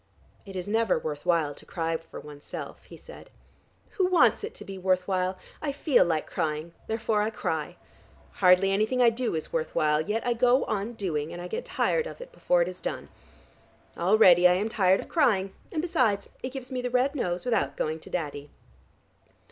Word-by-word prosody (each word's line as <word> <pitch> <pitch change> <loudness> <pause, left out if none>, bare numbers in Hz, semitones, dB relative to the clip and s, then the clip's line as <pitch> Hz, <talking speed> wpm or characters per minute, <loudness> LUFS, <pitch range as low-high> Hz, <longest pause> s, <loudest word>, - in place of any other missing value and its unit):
"It 195 - -9
is 180 0 -4
never 220 -1 +2
worth 150 +1 -5
while 165 -4 +2
to - - -15
cry 165 -1 -2
for 165 0 -8
oneself," 145 -1 -9
he - - -12
said. - - -13 0.7
"Who 370 - +4
wants 365 +3 +4
it 435 - -6
to - - -10
be 195 -1 -7
worth 185 -1 +1
while? 185 -1 0 0.2
I 295 - -1
feel 280 -1 +3
like 160 -2 -1
crying, 160 0 -3
therefore 220 -1 0
I 210 - +1
cry. 160 -8 -3 0.6
Hardly 185 - +4
anything 215 +6 +1
I 240 -2 +6
do 235 -4 -2
is 160 - -5
worth 160 -1 -2
while, 150 0 +2
yet 210 +7 -2
I 245 - +2
go 245 +2 +3
on 215 +2 -2
doing, 165 -8 -3
and 175 - -7
I 175 - -6
get 475 - -4
tired 485 0 0
of - - -9
it - - -10
before - - +2
it - - -5
is - - -8
done. - - -5 0.9
Already 180 -1 +6
I 180 - +4
am 200 +5 0
tired 190 -3 +3
of - - -11
crying, 195 - +2 0.2
and 315 -1 -2
besides 255 - +1
it 255 - -3
gives 260 0 -8
me 255 -1 -2
the 250 - -2
red 255 +3 +2
nose 180 -8 -2
without 140 - 0
going 155 +1 -2
to - - -14
Daddy. 145 -4 -4
195 Hz, 200 wpm, -27 LUFS, 170-250 Hz, 0.9 s, I